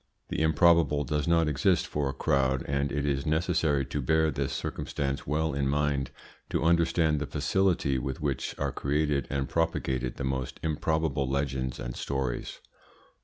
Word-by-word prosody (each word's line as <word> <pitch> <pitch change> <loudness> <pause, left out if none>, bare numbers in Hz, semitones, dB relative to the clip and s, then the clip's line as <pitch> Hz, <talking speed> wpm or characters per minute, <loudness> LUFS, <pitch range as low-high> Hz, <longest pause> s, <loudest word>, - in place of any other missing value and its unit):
The - - -2
improbable 80 -1 +4
does 75 0 -1
not 85 -1 +3
exist 85 +4 +2
for 75 -2 -2
a - - -3
crowd, 65 -1 +1
and 70 0 0
it 70 +1 -1
is 70 -1 0
necessary 80 -3 +1
to 70 +2 -3
bear 80 +4 +2
this 70 0 -2
circumstance 70 +1 -3
well 80 +2 0
in 70 0 0
mind 70 -1 0 0.4
to - - 0
understand 85 -2 +3
the 75 - -3
facility 75 -2 +1
with 65 +1 -4
which 70 -2 -2
are - - -1
created 75 -1 0
and 70 -1 -1
propagated 65 -6 -1
the - - -5
most 65 -1 -3
improbable 80 -3 0
legends 65 -2 -2
and - - -5
stories. 65 -3 -3
70 Hz, 160 wpm, -28 LUFS, 70-80 Hz, 0.4 s, improbable